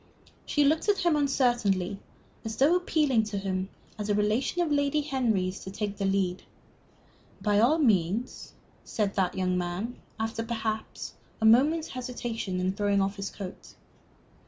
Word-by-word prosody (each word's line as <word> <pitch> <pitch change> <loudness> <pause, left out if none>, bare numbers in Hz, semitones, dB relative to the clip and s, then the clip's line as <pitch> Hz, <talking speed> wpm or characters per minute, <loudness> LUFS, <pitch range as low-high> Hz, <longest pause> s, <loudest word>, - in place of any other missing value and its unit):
She 295 - +3
looked 310 +7 +2
at 395 -3 +2
him 340 -3 +4
uncertainly, 240 -10 +1 0.4
as 220 -1 -4
though 285 +9 +4
appealing 305 -9 +2
to 210 -1 -4
him, 190 -1 -2 0.3
as 210 0 -3
a 205 - +3
relation 215 +11 +1
of 320 - -2
Lady 285 +1 +2
Henry's, 225 -10 0
to - - -8
take 205 +1 -4
the 200 - -1
lead. 190 -2 0 1.0
"By 205 +1 +2
all 255 +9 +4
means," 220 - 0 0.3
said 205 -3 -1
that 190 -2 0
young 185 -1 +1
man, 180 +8 -4 0.2
after 225 +1 -2
perhaps 220 -1 -4 0.3
a 220 - +1
moment's 290 +9 +5
hesitation, 240 -6 -4
and 185 +1 0
throwing 205 -1 +2
off 195 +1 0
his 195 0 -3
coat. 190 -3 -9
220 Hz, 155 wpm, -28 LUFS, 195-265 Hz, 1.0 s, moment's